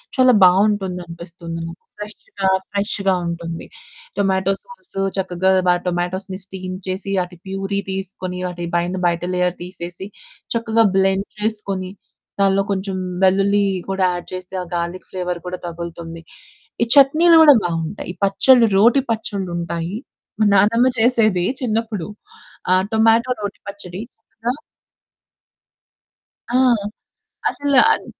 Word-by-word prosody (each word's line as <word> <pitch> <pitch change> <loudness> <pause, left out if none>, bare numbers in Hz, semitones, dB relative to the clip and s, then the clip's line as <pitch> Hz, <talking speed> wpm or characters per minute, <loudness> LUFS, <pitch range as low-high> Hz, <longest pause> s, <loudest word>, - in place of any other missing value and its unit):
చాలా 255 -1 +5
బావుంటుంది 190 0 +3
అనిపిస్తుంది 170 0 -8
నాకు. 170 +2 -11 0.2
ఫ్రెష్‌గా 210 -2 -3 0.2
ఫ్రెష్‌గా 200 -1 +1
ఉంటుంది. 170 -1 -5 0.5
టొమాటో 190 -1 +2
సాస్ 485 - -17 0.2
చక్కగా 185 0 +2
టొమాటోస్‌ని 185 +2 -2
స్టీమ్ 185 -1 -6
చేసి 190 +2 -3
ఆటి 180 0 -11
పూరీ 195 +1 -2
తీసుకొని 190 -1 -4
వాటి 175 -1 -4
పైన 175 +2 0
బయట 170 0 +1
లేయర్ 180 0 +1
తీసేసి 175 0 -7 0.5
చక్కగా 230 -1 +2
బ్లెండ్ 195 +1 +2
చేసుకొని. 210 -3 -2 0.5
దాంట్లో 195 0 +3
కొంచెం 195 0 -2 0.3
వెల్లుల్లి 200 +2 +3 0.2
కూడా 190 0 0
యాడ్ 175 -1 -6
చేస్తే, 185 0 -7
ఆ - - -9
గార్లిక్ 170 +2 -4
ఫ్లేవర్ 180 -1 -3
కూడా 180 0 -4
తగులుతుంది. 170 -1 -7 0.6
ఈ - - +2
చట్నీలు 310 +5 +6
కూడా 295 -2 +9
బావుంటాయి. 170 +2 -3
పచ్చడిలు 230 +4 +5
రోటి 235 +7 +5
పచ్చడ్లు 200 -4 -3
ఉంటాయి. 170 +2 -3 0.4
మా 215 - +4
నానమ్మ 230 +6 +4
చేసేది 225 -6 +3 0.2
చిన్నప్పుడు. 225 -6 -2 0.6
ఆ - - +6 0.2
టొమాటో 225 +3 +4
రోటి 205 -1 -5
పచ్చడి. 195 -2 -8 0.5
ఆ? - - +4 2.0
ఆ! - - +5 0.9
అసలు. 285 -1 0
అన్ - - 0
190 Hz, 115 wpm, -20 LUFS, 180-210 Hz, 2.0 s, కూడా